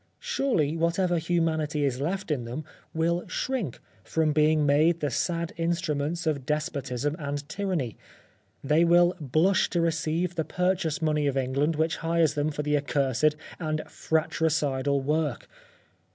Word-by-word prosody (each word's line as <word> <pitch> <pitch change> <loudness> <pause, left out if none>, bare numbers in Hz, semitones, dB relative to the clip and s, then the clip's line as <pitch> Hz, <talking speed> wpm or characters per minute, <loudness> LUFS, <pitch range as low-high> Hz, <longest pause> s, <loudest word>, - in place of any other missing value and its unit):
Surely 265 - 0
whatever 170 +1 +1
humanity 160 -3 0
is 130 -1 -1
left 185 +4 -2
in 135 -5 0
them 125 +6 -6 0.3
will 170 +2 0
shrink 250 - -2 0.2
from 160 -2 +1
being 155 0 +3
made 155 +4 +3
the 145 -3 -1
sad 170 +5 -1
instruments 165 -1 -1
of 150 -4 0
despotism 145 -1 -2
and 145 -1 -4
tyranny 165 - -2 0.4
— - - -35 0.3
they 150 +4 +3
will 175 +1 +5
blush 160 +8 +2
to 175 - 0
re 165 0 +3
ceive 165 +2 -1
the 160 - -1
purchase 180 0 -1
money 150 -2 +1
of 135 -1 0
England 135 +4 +1
which 160 +1 0
hires 165 -2 +2
them 145 +1 0
for 150 0 -3
the 150 0 +1
accursed 145 0 +1 0.2
and 155 -2 -2
fratricidal 145 -3 0
work. 150 +3 -1
155 Hz, 150 wpm, -27 LUFS, 145-170 Hz, 0.4 s, will